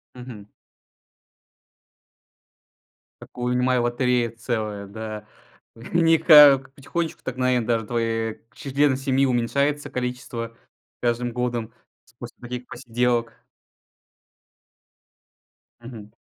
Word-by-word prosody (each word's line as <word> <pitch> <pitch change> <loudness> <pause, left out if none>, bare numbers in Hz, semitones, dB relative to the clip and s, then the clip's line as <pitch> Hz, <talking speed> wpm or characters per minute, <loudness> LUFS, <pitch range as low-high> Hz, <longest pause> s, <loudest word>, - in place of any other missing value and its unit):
Мгм. 120 -5 -10 2.7
Такую, 125 0 -4
вынимай, 125 0 +2
лотерея 120 0 +1
целая, 110 -3 -4
да. 105 0 -7 0.5
Они 165 +7 +2
как 145 -4 +7
потихонечку 160 +4 -4
так 130 0 -5
наверно, 125 -3 +1
даже 115 -2 0
твоей 115 -1 -2
члены 140 0 +1
семьи 135 0 +1
уменьшается 140 +4 0
количество 125 -2 -5 0.4
с - - -74
каждым 120 0 0
годом 120 -2 -3 0.3
с - - -26
после 120 0 -10
таких 125 0 -6
посиделок. 120 -1 -2 2.4
Мгм. 115 -3 -11
125 Hz, 90 wpm, -23 LUFS, 115-130 Hz, 2.7 s, как